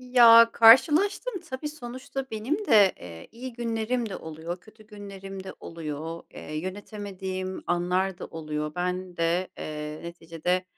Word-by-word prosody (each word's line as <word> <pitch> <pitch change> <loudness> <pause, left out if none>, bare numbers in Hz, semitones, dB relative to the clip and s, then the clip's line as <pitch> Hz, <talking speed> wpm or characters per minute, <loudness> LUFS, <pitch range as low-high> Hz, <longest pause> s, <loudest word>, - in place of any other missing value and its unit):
Ya, 235 -2 +8
karşılaştım 320 - +6 0.2
tabii, 260 +3 -4
sonuçta 265 -1 -6
benim 265 - -2
de, 210 -7 +6
eee, 85 -2 -10
iyi 250 +2 -7
günlerim 230 0 -2
de 195 - -5
oluyor 160 +3 -7
kötü 215 +1 -18
günlerim 195 -2 -9
de - - -8
oluyor. 165 0 -6
Eee, 155 - -8
yönetemediğim 190 0 -5
anlar 180 +2 0
da - - -6
oluyor. 150 -1 -4
Ben 180 0 -3
de, 170 +2 +1
eee, 150 0 -5
neticede, 170 +2 -2
190 Hz, 135 wpm, -27 LUFS, 170-230 Hz, 0.2 s, Ya